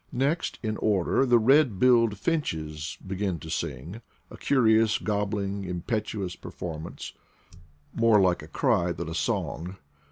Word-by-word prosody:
Next 140 +7 -1
in 110 -1 -2
order 105 +5 +1
the 120 -1 +5
red 130 -1 +4
billed 115 -2 +4
finches 80 - -3
begin 95 -1 -2
to 80 0 -9
sing— 85 - -4 0.3
a - - -9
curious, 110 -4 +3
gobbling, 100 -1 -2
impetu 100 +4 -3
ous 90 - -6
performance, 80 -1 -7 0.8
more 115 -2 +4
like 90 -2 +2
a - - -10
cry 85 0 +1
than 85 0 -5
a - - -5
song. 90 +2 -2
100 Hz, 135 wpm, -27 LUFS, 90-115 Hz, 0.8 s, the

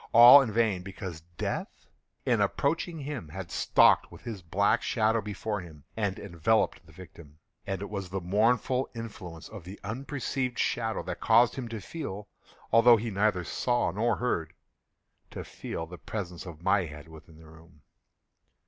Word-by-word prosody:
All 120 +4 +11
in 125 -5 -2
vain; 110 -4 +1
because 90 -3 -7 0.2
Death, - - -4 0.4
in - - +2
approaching 160 +2 0
him 135 - -6
had 90 +1 -7
stalked - - +4
with - - -13
his 110 -5 -6
black 100 +7 +1
shadow 110 -1 +1
before 105 0 -4
him, 80 -5 -13
and 100 -3 -1
enveloped 100 +3 0
the 80 - -18
victim. 80 -3 -14 0.3
And 95 0 -3
it - - -6
was 100 -3 -4
the 95 +1 -3
mournful 115 +7 +1
influence 95 -8 -8
of 105 -5 -10
the 95 +4 -10
unperceived 130 +2 -3
shadow 115 -2 -1
that 90 -1 -5
caused 115 +1 +5
him 130 -3 -5
to 115 -1 -5
feel—although 115 - +1
he 115 +1 -4
neither 100 -2 +1
saw 120 +2 0
nor 110 +5 +1
heard—to 85 -10 -7
feel 80 - -6
the 90 +1 -11
presence 90 -3 -6
of 85 -1 -10
my 95 0 +3
head 75 0 -10
within 80 0 -14
the 80 - -16
room. 80 0 -18
100 Hz, 155 wpm, -28 LUFS, 85-115 Hz, 0.4 s, All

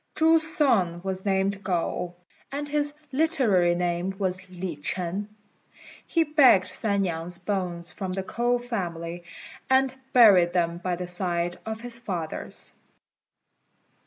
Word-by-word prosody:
Chu's 320 0 +5
son 185 - +2
was 190 0 -3
named 195 0 0
Ngo, 175 0 -2 0.4
and 290 +1 -4
his 290 0 -1 0.2
literary 250 - +2
name 175 +2 -1
was 185 -2 -2
Li 180 -2 -5
ch'ên. 180 +6 -2 0.8
He 330 - +2
begged 280 -12 +5
San 200 0 0
niang's 170 0 -3
bones 175 -3 -3
from 185 +1 -5
the 190 0 -3
K'ou 240 +4 0
family, 175 -7 -4 0.5
and 265 0 +3 0.2
buried 195 -8 +6
them 170 -1 0
by 180 0 -2
the 180 +1 -5
side 175 -1 -1
of 220 0 -4
his 240 -1 -3
father's. 180 -9 -5
190 Hz, 130 wpm, -26 LUFS, 175-235 Hz, 0.8 s, buried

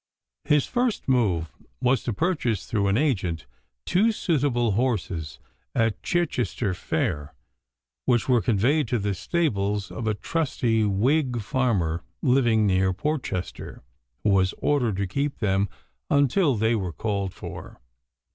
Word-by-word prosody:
His 150 -2 +3
first 245 -2 -1
move 100 -11 +1 0.3
was 125 +1 +2
to 120 - 0
purchase 120 - 0
through 100 -3 0
an 100 +2 +2
agent 95 - 0 0.4
two 215 +6 +3
suitable 135 - +1
horses 95 - -1 0.4
at 115 -3 +1
Chichester 125 - -1
fair, 75 -4 -2 0.7
which 120 -2 +2
were 125 -3 +4
conveyed 120 +7 +2
to 120 - 0
the 100 -1 -1
stables 105 - -1
of 115 - -4
a 105 - +1
trusty 120 -6 0
Whig 125 +6 +1
farmer 100 -9 0 0.2
living 120 -5 +3
near 95 -1 +2
Portchester, 100 - -4 0.4
who 105 - +3
was 95 -1 +2
ordered 125 -8 +1
to 100 - 0
keep 140 +9 -2
them 95 -2 +1 0.4
until 140 +1 +3
they 110 +2 +2
were 95 -6 -2
called 100 +1 -2
for. - - -9
115 Hz, 130 wpm, -25 LUFS, 100-135 Hz, 0.7 s, were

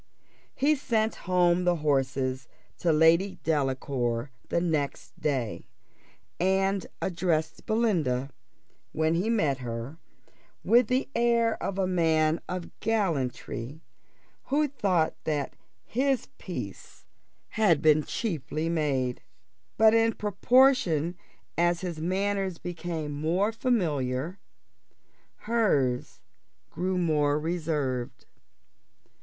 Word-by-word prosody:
He 295 +3 +3
sent 225 -6 0 0.2
home 180 -1 +3
the 175 0 +3
horses 135 -4 0 0.3
to 170 - +2
Lady 165 +5 +4
Delacour 135 -4 -1 0.2
the - - +1
next 155 -5 -2
day, 130 -7 -2 0.7
and 195 +1 +1 0.2
addressed 170 -3 -1
Belinda, 165 - +1 0.6
when 160 +1 +1
he 180 +6 0
met 155 - +1
her, 120 +5 -6 0.6
with 240 -1 +5
the 255 +3 0
air 235 -1 +2
of 195 - -3
a 195 - +2
man 160 -3 +2
of 180 -1 -4
gallantry, 155 - -2 0.6
who 300 +2 +2
thought 190 - +1
that 145 -3 -2 0.3
his 265 +2 0
peace - - -8 0.4
had 210 -9 +3
been 155 0 +5
cheaply 160 - -3
made. 135 -6 0 0.6
But 220 0 +6
in 225 0 +3
proportion 205 - +3 0.4
as 175 0 +2
his 170 -4 -4
manners 190 +1 -1
became 170 -3 -5
more 165 +8 0
familiar, 170 - -1 1.0
hers 150 - 0 0.5
grew 185 +1 -1
more 150 -4 +2
reserved. 150 -7 -2
170 Hz, 100 wpm, -28 LUFS, 145-200 Hz, 1.0 s, But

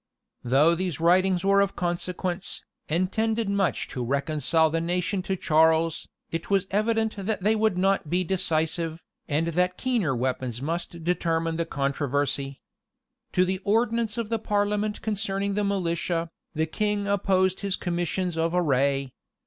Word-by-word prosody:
Though 140 +7 +4
these 180 -2 -2
writings 180 +2 +3
were 200 0 +5
of 200 -1 0
consequence, 175 +1 -3 0.3
and 180 +4 +1
tended 225 0 0
much 200 -2 0
to 125 - -4
reconcile 150 +4 +1
the 165 +1 0
nation 180 +3 -1
to 190 +1 -2
Charles, 160 -1 +2 0.2
it 165 0 -4
was 195 -1 +2
evident 220 +1 +1
that 200 -1 -2
they 215 +2 +3
would 215 -3 +1
not 195 -4 +1
be 180 +3 +1
decisive, 165 -2 -1 0.2
and 160 +3 0
that 180 +2 0
keener 225 - 0
weapons 125 -1 -2
must 165 +3 -4
determine 165 -1 0
the 170 0 -1
controversy. 140 -1 -1 0.7
To 185 - +4
the 185 0 -1
ordinance 225 +2 +1
of 230 -3 -2
the 225 -1 0
parliament 210 0 0
concerning 200 -2 -1
the 210 +1 0
militia, 170 -3 -1 0.2
the 160 +1 +1
king 205 +4 -1
opposed 190 -2 +2
his 200 -2 0
commissions 175 0 -2
of 165 +1 +1
array. 140 -5 +1
180 Hz, 150 wpm, -26 LUFS, 160-200 Hz, 0.7 s, were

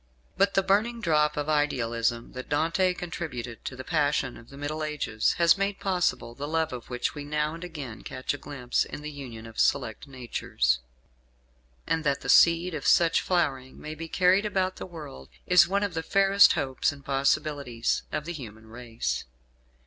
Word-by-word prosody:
But 195 +1 +2
the 195 - +4
burning 220 +5 +1
drop 150 -6 +2
of 145 0 -1
idealism 120 -6 0
that 130 0 -8
Dante 165 +5 +1
contributed 140 -10 -6
to 130 - -4
the 130 - -7
passion 145 -4 0
of 115 - -14
the 140 - -12
Middle 150 +2 -3
Ages 150 -8 0
has 170 +2 +4
made 200 0 -1
possible 180 -10 0
the 140 +4 -5
love 160 -1 0
of 120 -2 -8
which 125 -1 -2
we 145 -1 -6
now 150 +1 -1
and 165 +1 -8
again 145 -10 -7
catch 130 +2 -4
a 145 - -6
glimpse 125 -4 -1
in 150 - -8
the 150 - -5
union 125 -6 -9
of 115 -1 -9
select 125 -1 +1
natures. 115 - -1 1.1
And 160 - 0
that 140 -3 0
the - - -6
seed 170 +1 +5
of 150 - -3
such 165 -1 +5
flowering 135 -8 -1
may 155 - -6
be 165 +1 -7
carried 185 +4 +3
about 185 -2 -1
the - - -6
world 150 - -10 0.2
is 180 -2 +6
one 200 +2 +1
of 200 -3 -2
the 160 - -2
fairest 195 +4 +5
hopes 135 -2 0
and 140 -1 -13
possibilities 140 -3 0
of 150 - -3
the 170 - -4
human 110 -7 -9
race. 115 0 -4
150 Hz, 185 wpm, -27 LUFS, 130-170 Hz, 1.1 s, is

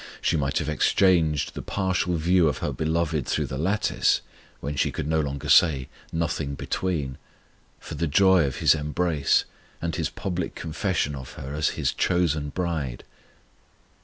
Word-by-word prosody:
She - - +1
might 70 -3 0
have 80 -4 -1
exchanged 80 -1 +2
the - - -5
partial 95 -2 -1
view 85 +1 +3
of 70 - 0
her - - -2
Beloved 80 -2 -1
through - - 0
the 65 - -5
lattice, 100 +6 +1 0.4
when 75 +1 -4
she - - +1
could - - -4
no 80 0 +1
longer 70 -2 -3
say 70 -7 +4 0.2
"Nothing 80 -3 -2
between," 75 -6 -2 0.6
for - - -8
the 85 - -1
joy 95 +2 +5
of 65 - -3
His - - +4
embrace, 75 0 +1 0.3
and 85 0 -3
His 80 -3 -1
public 90 -3 -4
confession 80 -2 -1
of 65 -2 -8
her 70 +2 -7
as 75 +1 0
His - - 0
chosen 80 -5 +1
bride! 80 -7 -3
80 Hz, 160 wpm, -25 LUFS, 70-90 Hz, 0.6 s, joy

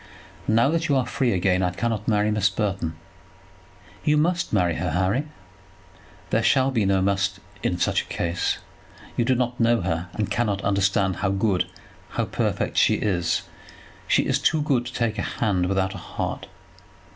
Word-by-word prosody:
Now 115 +5 +4
that 165 +1 0
you 140 - +2
are 130 -2 +2
free 125 -3 0
again 90 0 +2
I 90 - +2
cannot 105 +3 -2
marry 105 -1 +2
Miss 105 -2 +2
Burton." 95 -5 -2 1.1
"You 150 0 +3
must 175 +3 +1
marry 90 -5 +2
her, 90 - -1
Harry." 95 - +1 1.1
"There 110 - +3
shall 130 +4 +3
be 115 -6 +1
no 95 -1 +2
must 95 -1 0 0.2
in 90 - 0
such - - +1
a - - -12
case. 85 0 -1 0.6
You 120 - +1
do 130 +1 +3
not 125 0 -1
know 115 -2 +3
her, 85 0 -2
and 105 - -2
cannot 105 -5 0
understand 95 -1 +1
how 100 0 0
good, 100 -1 +1 0.5
how - - +2
perfect - - -1
she - - +5
is. 85 -5 0 0.6
She - - +3
is - - +1
too 155 -2 +2
good 130 -5 +1
to 125 - -8
take 115 -2 -1
a - - +1
hand 95 -6 0
without 95 0 0
a 95 - -7
heart." - - -4
105 Hz, 175 wpm, -24 LUFS, 95-120 Hz, 1.1 s, she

